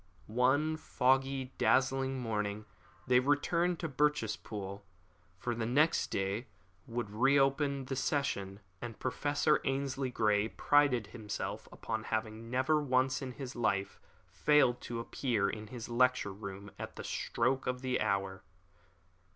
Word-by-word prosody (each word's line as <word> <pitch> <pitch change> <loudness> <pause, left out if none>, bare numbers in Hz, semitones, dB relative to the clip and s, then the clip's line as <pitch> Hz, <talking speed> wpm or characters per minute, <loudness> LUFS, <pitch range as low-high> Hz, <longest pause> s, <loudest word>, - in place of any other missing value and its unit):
One 130 +7 +2
foggy, 135 -1 +1
drizzling 135 0 +2
morning 105 -3 -2 0.4
they 125 -1 +5
returned 170 +6 +1
to 165 - -1
Birchespool, 110 -8 -1 0.6
for 120 +6 -2
the 115 -1 -2
next 150 +7 +3
day 100 +5 -2 0.4
would 115 -3 -3
re 135 +6 +4
open 140 0 +2
the 135 +1 -3
session, 110 -8 -1 0.2
and 120 -2 -6
Professor 145 +3 +1
Ainslie 135 -1 -1
Grey 105 -3 +2
prided 140 -2 +3
himself 105 -1 -5
upon 110 -1 -4
having 110 +1 -3
never 130 +5 +2
once 130 -1 +1
in 130 -2 -5
his 135 -1 -7
life 100 -4 0 0.3
failed 125 +5 +3
to 120 -1 -4
appear 115 -3 0
in 105 +1 -5
his 120 0 -7
lecture 125 -4 +2
room 100 0 -8
at - - -6
the - - -7
very - - -6
stroke 135 0 0
of 125 0 -1
the 130 -1 0
hour. 95 -1 -1
125 Hz, 135 wpm, -33 LUFS, 110-135 Hz, 0.6 s, they